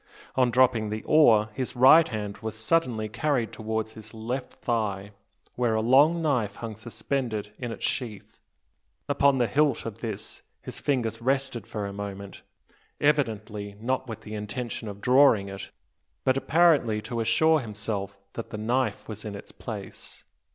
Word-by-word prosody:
On 130 -2 +3
dropping 120 -3 +3
the 110 +1 -4
oar, 110 -9 +5
his 130 +3 -4
right 135 +6 +7
hand 105 -3 -5
was 110 -1 -5
suddenly 110 -3 +1
carried 120 0 0
towards 110 0 -3
his 110 0 -12
left 120 +4 -4
thigh, 105 -4 -2 0.4
where 120 -3 +1
a 110 - +1
long 145 +8 +5
knife 120 -10 0
hung 115 -2 -6
suspended 115 -2 -3
in 120 -2 -4
its - - -4
sheath. 115 -7 -4 0.7
Upon 140 -1 +3
the 125 - +3
hilt 145 +6 +1
of 115 -1 -6
this 110 -4 -5 0.2
his - - -8
fingers 115 -5 -1
rested 135 -1 -1
for 105 -2 -4
a 100 - -5
moment, 100 -1 -7 0.6
evidently 110 -8 0
not 130 +3 -1
with 110 - -6
the 105 - -9
intention 110 +2 -5
of 100 0 -7
drawing 125 -6 +5
it, 95 -2 -7 0.5
but 130 - +3
apparently 145 -7 +3
to 115 +2 -4
assure 155 +8 +3
himself 105 -4 -4 0.2
that 115 - -6
the 105 - -6
knife 115 0 -1
was 110 -1 -7
in 105 -2 -5
its 100 - -10
place. 105 -5 -8
115 Hz, 160 wpm, -27 LUFS, 105-130 Hz, 0.7 s, right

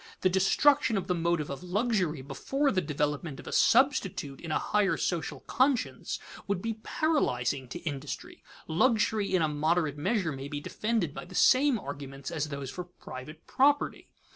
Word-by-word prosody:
The 185 - +4
destruction 230 +6 +4
of 190 - -2
the 180 - 0
motive 170 -3 0
of 140 - -6
luxury 180 - 0
before 275 - 0
the 185 - +1
development 150 -1 -2
of - - -10
a - - -6
substitute 225 - +2
in 165 - -5
a - - +2
higher 210 -2 +1
social 160 -5 -2
conscience, 260 -2 0 0.3
would 200 -2 0
be 225 +2 -4
paralyzing 140 - 0
to 175 - -6
industry. 145 -3 -6 0.2
Luxury 215 +3 +2
in 175 - +3
a - - +3
moderate 155 0 0
measure 190 0 0
may 135 0 -6
be 145 0 -4
defended 210 -1 -1
by - - -7
the 180 +1 -12
same 265 +3 +5
arguments 140 -3 -7
as 155 -2 -2
those 140 -2 -5
for 180 - -6
private 155 -3 -10
property. 285 +2 +2
175 Hz, 165 wpm, -29 LUFS, 145-220 Hz, 0.3 s, same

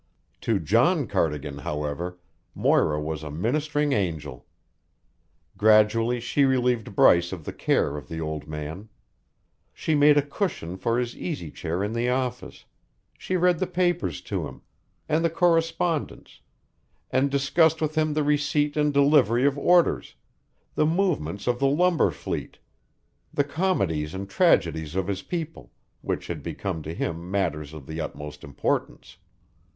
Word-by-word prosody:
To 115 - +1
John 120 - +2
Cardigan, 75 -7 -2
however, 75 +5 -4 0.4
Moira 75 0 +2
was 75 0 -4
a 75 - -7
ministering 145 - 0
angel. 80 - -3 1.1
Gradually 110 +3 +4
she 130 +4 +1
relieved 125 -6 +1
Bryce 85 -1 +5
of 85 -5 -7
the - - -5
care 75 +1 0
of 70 -4 -9
the 80 - -6
old 75 -1 -4
man. 80 +7 -6 0.8
She 160 - -2
made 145 0 +5
a 145 - +4
cushion 145 - -3
for 115 +5 0
his 120 -1 -2
easy 140 - -5
chair 85 +3 -3
in 105 +2 -2
the 120 +1 0
office; 125 -1 -3 0.5
she 185 - -2
read 180 -1 +3
the 185 - 0
papers 175 -1 0
to - - -3
him, - - -13 0.4
and 160 +2 +1
the 165 - +3
correspondence, 165 -1 0 0.7
and 135 +2 +2
discussed 150 +4 +3
with 155 -1 -1
him 155 -1 0
the 155 - +1
receipt 145 0 +1
and 150 -1 +2
delivery 140 -4 +4
of 140 -1 +3
orders, 175 +4 +2 0.6
the 155 - +2
movements 160 - 0
of 120 0 0
the 140 - +3
lumber 170 - +3
fleet, 75 -4 -5 0.7
the 145 - +1
comedies 100 - -1
and 100 +1 -5
tragedies 85 - +2
of 95 -1 0
his 95 0 -3
people, 165 - -6 0.3
which - - -3
had - - -5
become 95 -5 -4
to 75 - -6
him 85 +1 -4
matters 80 -7 -1
of 75 -4 -10
the 80 +3 -5
utmost 75 -1 -7
importance. 70 -2 -3
115 Hz, 145 wpm, -25 LUFS, -, 1.1 s, Bryce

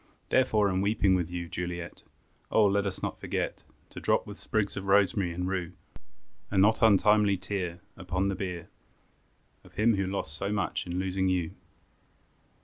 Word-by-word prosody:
Therefore 110 -5 +3
in 95 -1 0
weeping 100 -1 +2
with 90 -3 0
you, 85 -1 -4
Juliet, 85 0 -5 0.5
Oh! 110 - +4
let 100 0 +2
us 95 - -5
not - - -3
forget, - - -3 0.3
To - - -8
drop - - +1
with - - -9
sprigs 105 -2 -1
of 95 - -5
rosemary 95 -2 +3
and 90 +2 -3
rue, 90 -2 -2 0.8
A 100 - -2
not 105 +4 +4
untimely 105 -2 +5
tear 90 -2 -4
Upon 95 +1 -2
the 100 - 0
bier, 90 -4 -5 0.9
Of - - -19
him 110 0 +3
who 95 -1 0
lost 95 -6 -3
so 100 +4 -3
much 100 -3 -1
in 90 0 -3
losing 95 0 0
you. 90 -3 0
95 Hz, 165 wpm, -29 LUFS, 90-100 Hz, 0.9 s, untimely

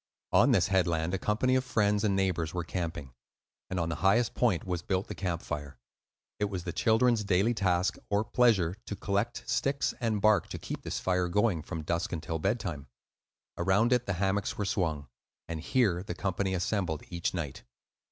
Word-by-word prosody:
On - - +5
this - - +3
headland 85 -3 +1
a 95 - 0
company 115 +6 +1
of 130 0 +3
friends 105 -4 +1
and 100 -2 +2
neighbors 90 -4 0
were 90 - -1
camping; 80 -6 -4 0.6
and 95 - -2
on 85 -1 -1
the 85 - -3
highest 105 +5 +3
point 110 -10 +1
was 90 -2 -2
built 95 +2 -1
the - - -5
camp 85 -4 -3
fire. 70 -4 -5 0.6
It 105 - +2
was 95 -4 -4
the 85 - -4
children's 115 0 +3
daily 100 +4 +2
task 95 -4 +1
(or 105 +1 +2
pleasure) 110 -7 +3
to 105 - -3
collect 100 +5 -2
sticks 140 +1 0
and 115 -4 0
bark 110 +1 +4
to - - -5
keep - - -6
this - - -3
fire 90 -1 +1
going 100 -2 +1
from 80 0 -6
dusk 85 +2 -1
until 80 0 -3
bedtime. 95 - -2 0.7
Around 100 +7 +3
it 125 0 +1
the 95 - 0
hammocks 95 +2 -1
were 105 - -1
swung, 80 -8 -1 0.4
and 80 -1 -4
here 100 - +2
the 100 - -5
company 95 0 -1
assembled 90 -4 -1
each 85 +1 -2
night. 75 -6 -4
95 Hz, 185 wpm, -30 LUFS, 85-105 Hz, 0.7 s, On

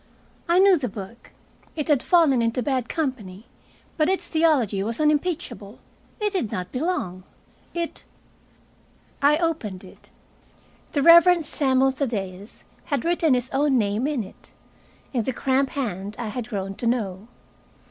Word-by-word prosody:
I 345 - +4
knew 380 -2 +6
the 250 -4 -2
book. 205 +4 -10 0.4
It 300 -3 -3
had 290 -5 +3
fallen 315 -9 +4
into 230 +2 0
bad 260 -3 -1
company, 235 - -4 0.5
but 310 0 +2
its 380 - -1
theology 290 - +2
was 225 +3 -3
unimpeachable. 300 - -1 0.4
It 420 -1 -1
did 260 - -1
not 180 0 -4
belong. 250 - -2 0.5
It 340 -1 -4 1.2
I 290 +2 +5
opened 300 - -2
it. 185 - -16 0.8
The 285 - +1
Reverend 340 0 +7
Samuel 270 -2 +2
Thaddeus 205 -7 -5 0.2
had 285 -6 -2
written 335 -5 +2
his 250 +1 -2
own 275 -1 +2
name 215 +3 0
in 290 -7 -1
it, 190 - -13 0.6
in 240 -3 0
the 260 - -2
cramped 265 +2 0
hand 210 -7 -4
I 235 -3 -4
had 240 +2 -5
grown 195 -3 -4
to 235 - -2
know. 210 -4 -2
260 Hz, 145 wpm, -24 LUFS, 210-310 Hz, 1.2 s, Reverend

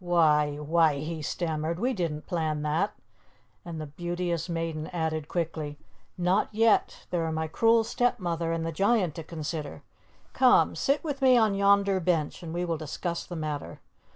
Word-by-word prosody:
"Why 150 -4 +3
why 155 +1 +2
" - - -4
he 160 +1 -4
stammered, 160 +1 -2
"we 250 +4 +1
didn't 165 -7 -3
plan 155 -4 -1
that." 160 +7 0 0.7
And 170 -2 -6
the 155 - -4
Beauteous 175 +2 -3
Maiden 165 -2 -3
added 160 -3 -2
quickly, 155 -4 -3 0.4
"Not 180 +3 +2
yet. 220 0 +2
There 175 -2 0
are 160 - -1
my 160 0 -2
cruel 225 +7 +3
stepmother 175 -9 -1
and 165 0 -1
the 165 - -2
giant 195 0 +2
to 165 - -7
consider. 155 -2 -5 0.5
Come, 255 -1 +4
sit 280 +2 +1
with 290 -3 -4
me 260 -2 +6
on 220 -3 +3
yonder 200 -1 +3
bench, 165 -4 0
and 165 -2 -7
we 175 +2 -2
will 165 -2 -1
discuss 170 +3 -4
the 175 - -6
matter." 155 -3 -4
170 Hz, 170 wpm, -28 LUFS, 155-190 Hz, 0.7 s, me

